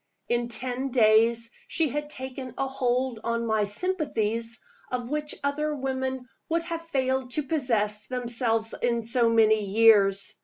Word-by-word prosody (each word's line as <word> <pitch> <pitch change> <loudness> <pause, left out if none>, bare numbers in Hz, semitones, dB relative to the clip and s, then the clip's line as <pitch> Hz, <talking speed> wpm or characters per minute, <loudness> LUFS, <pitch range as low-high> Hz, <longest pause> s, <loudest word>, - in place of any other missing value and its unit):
In 240 0 0
ten 250 +3 -3
days 230 -1 +3 0.2
she 325 -3 0
had 295 +3 -4
taken 260 -2 -7
a 270 - 0
hold 255 -2 -1
on 235 0 -1
my 220 -2 +1
sympathies 230 - -1 0.3
of 250 0 -3
which 300 0 -1
other 300 +2 -1
women 260 -1 -3 0.2
would 335 +1 +1
have 335 -1 -4
failed 265 -5 -1
to 300 - +1
possess 230 -8 0
themselves 235 -3 -1
in 235 -1 +1
so 230 +1 +2
many 220 -2 +4
years. 200 -1 +4
245 Hz, 145 wpm, -26 LUFS, 225-270 Hz, 0.3 s, many